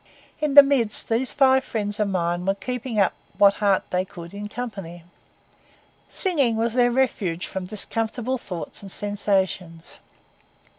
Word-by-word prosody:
In 300 -2 -1
the 285 - +12
midst, 265 -6 +1
these 235 +3 0
five 265 -1 +4
friends 210 -3 -3
of 210 - +1
mine 175 -2 -1
were 195 +1 0
keeping 250 +1 -4
up 195 - +3 0.2
what 200 -1 +5
heart 200 -2 +3
they 180 0 +1
could 170 -1 -11
in 205 +1 -6
company. 195 -8 -7 1.1
Singing 285 - +2
was 225 +1 0
their 245 -1 +3
refuge 215 -9 -1
from 190 -1 -6
discomfortable 225 +5 -2
thoughts 180 -7 -6
and 195 -2 -10
sensations. 190 -5 -2
210 Hz, 145 wpm, -23 LUFS, 190-245 Hz, 1.1 s, the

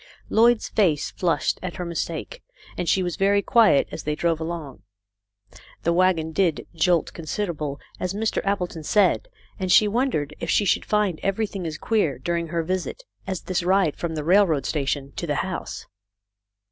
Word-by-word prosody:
Lloyd's 235 +1 +4
face 165 -8 +1
flushed 175 -3 0
at 180 -1 -5
her 180 - -4
mistake, 170 - -4 0.3
and 175 - -2
she 190 - +3
was 175 -2 -3
very 200 +1 +3
quiet 220 -12 +4
as - - -5
they 150 0 -2
drove 165 0 0
along. 160 -5 -5 1.0
The 170 - +2
wagon 175 -3 +2
did 170 -2 +1
"jolt 170 0 +1
considerable," 155 -4 -3 0.2
as 185 +1 -2
Mr. 220 +1 -1
Appleton 180 -5 -2
said, 205 - +2 0.3
and 185 -1 -1
she 210 +2 +7
wondered 205 - -1
if - - -4
she 205 - +3
should - - +1
find 210 -6 +1
everything 195 -2 -2
as 155 -1 -5
queer 210 -10 0
during 170 +5 -2
her 165 +1 -1
visit 185 - -3 0.2
as 190 -2 -3
this 185 -1 -1
ride 180 -3 +2
from 165 -2 -4
the 155 - -3
railroad 170 -5 +3
station 140 -2 -2
to 170 - -3
the 145 - 0
house. 185 -1 -5
175 Hz, 170 wpm, -24 LUFS, 160-200 Hz, 1.0 s, she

